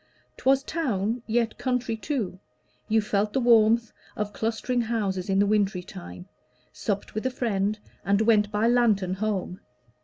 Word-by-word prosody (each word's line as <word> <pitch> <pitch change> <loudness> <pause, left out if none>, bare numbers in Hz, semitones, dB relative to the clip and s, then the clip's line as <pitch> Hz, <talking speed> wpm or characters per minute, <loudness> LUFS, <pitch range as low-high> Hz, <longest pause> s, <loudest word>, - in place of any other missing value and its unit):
'Twas 270 +1 +3
town, 235 - -1
yet 230 0 0
country 250 -2 -1
too: 220 -6 -3 0.5
you 220 +1 +3
felt 210 0 0
the - - +2
warmth 230 -1 +4 0.2
Of 210 -1 -3
clustering 230 +2 -1
houses 205 -5 -2
in 195 - +2
the 200 - +4
wintry 200 -3 +1
time: 90 - -10 0.5
Supped 200 -1 -3
with 215 - -3
a - - +1
friend, 215 -5 -1 0.3
and 200 +1 +2
went 215 -2 +3
by 210 +1 +2
lantern 220 -6 +3
home. 195 -2 -2
215 Hz, 150 wpm, -26 LUFS, 200-235 Hz, 0.5 s, warmth